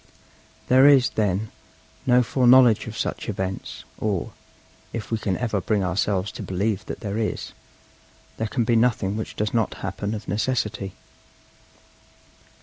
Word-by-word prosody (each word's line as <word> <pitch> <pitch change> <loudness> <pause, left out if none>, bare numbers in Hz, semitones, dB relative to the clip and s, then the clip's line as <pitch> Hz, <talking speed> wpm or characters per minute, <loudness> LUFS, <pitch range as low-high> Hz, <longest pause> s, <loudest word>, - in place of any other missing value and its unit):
There 130 +2 +6
is, 135 -3 +5
then, 105 0 -1 0.6
no 125 0 +5
foreknowledge 125 -2 +5
of 110 0 -7
such - - -3
events; 95 -2 -4 0.2
or, 100 -5 -1 0.6
if 115 -2 -5
we 115 - 0
can 95 -4 -1
ever 110 -5 -1
bring 105 -1 0
ourselves 95 +1 0
to - - -8
believe 100 +2 -1
that - - -6
there 105 -1 -3
is, 110 - -3 0.9
there 110 - -1
can 120 +2 0
be 115 +1 +2
nothing 110 -4 +2
which 110 - -5
does 105 0 -2
not 115 -3 0
happen 100 +3 -3
of 105 - -8
necessity. 105 -4 -1
110 Hz, 145 wpm, -24 LUFS, 100-120 Hz, 0.9 s, There